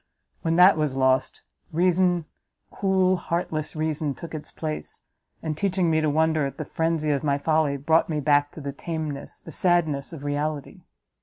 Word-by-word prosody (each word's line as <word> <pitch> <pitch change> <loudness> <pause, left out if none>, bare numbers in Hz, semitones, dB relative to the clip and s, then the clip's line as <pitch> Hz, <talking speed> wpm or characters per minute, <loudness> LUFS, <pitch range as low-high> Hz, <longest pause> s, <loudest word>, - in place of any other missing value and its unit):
when 165 0 0
that 180 +1 +7
was 150 -4 0
lost, 130 0 +1 0.3
reason, 175 0 +2 0.5
cool, 190 -1 +2
heartless 160 -3 -3
reason, 155 -2 -1
took 165 -2 -9
its 155 -1 -7
place, 155 -1 -5 0.4
and 155 -2 -2
teaching 185 0 +1
me 160 0 +2
to 155 - +2
wonder 160 0 +2
at 135 - -9
the - - -4
frenzy 160 -2 0
of 140 0 0
my 140 -2 +2
folly, 155 -1 +1
brought 160 +5 +2
me 155 -2 -1
back 145 0 +3
to 155 - -11
the 140 -1 -5
tameness 155 -2 -5
the - - -11
sadness 160 -6 +1
of 155 -4 -9
reality!" 145 0 -3
155 Hz, 170 wpm, -25 LUFS, 145-165 Hz, 0.5 s, that